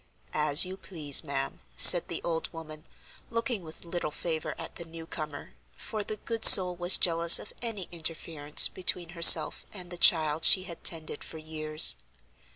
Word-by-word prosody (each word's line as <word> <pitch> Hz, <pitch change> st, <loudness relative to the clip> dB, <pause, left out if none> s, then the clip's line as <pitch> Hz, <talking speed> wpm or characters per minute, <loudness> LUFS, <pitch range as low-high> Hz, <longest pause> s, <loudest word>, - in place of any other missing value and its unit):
"As 150 Hz, +1 st, +2 dB
you 185 Hz, +1 st, -11 dB
please, 155 Hz, -8 st, -3 dB
ma'am," 70 Hz, -, -7 dB, 0.2 s
said -, -, +6 dB
the -, -, -6 dB
old 165 Hz, -1 st, -7 dB
woman, 155 Hz, -1 st, -13 dB, 0.4 s
looking 230 Hz, -2 st, -6 dB
with 160 Hz, 0 st, -15 dB
little 170 Hz, -2 st, -7 dB
favor 160 Hz, +1 st, -8 dB
at -, -, -12 dB
the -, -, -9 dB
new 165 Hz, 0 st, -14 dB
comer, 155 Hz, -3 st, -11 dB, 0.2 s
for 215 Hz, -1 st, -9 dB
the 215 Hz, -, -9 dB
good 225 Hz, +1 st, -9 dB
soul 180 Hz, -2 st, +8 dB
was 175 Hz, +1 st, +4 dB
jealous 170 Hz, -1 st, +2 dB
of -, -, -12 dB
any 220 Hz, -6 st, -7 dB
interference 160 Hz, -3 st, -2 dB
between 180 Hz, -2 st, -2 dB
herself 170 Hz, -1 st, +3 dB
and 180 Hz, -3 st, -13 dB
the 175 Hz, -, -10 dB
child 155 Hz, -2 st, +1 dB
she 185 Hz, -, +3 dB
had 170 Hz, -3 st, -14 dB
tended 160 Hz, -3 st, -3 dB
for 160 Hz, -, -10 dB
years. 155 Hz, 0 st, 0 dB
165 Hz, 165 wpm, -25 LUFS, 155-180 Hz, 0.4 s, soul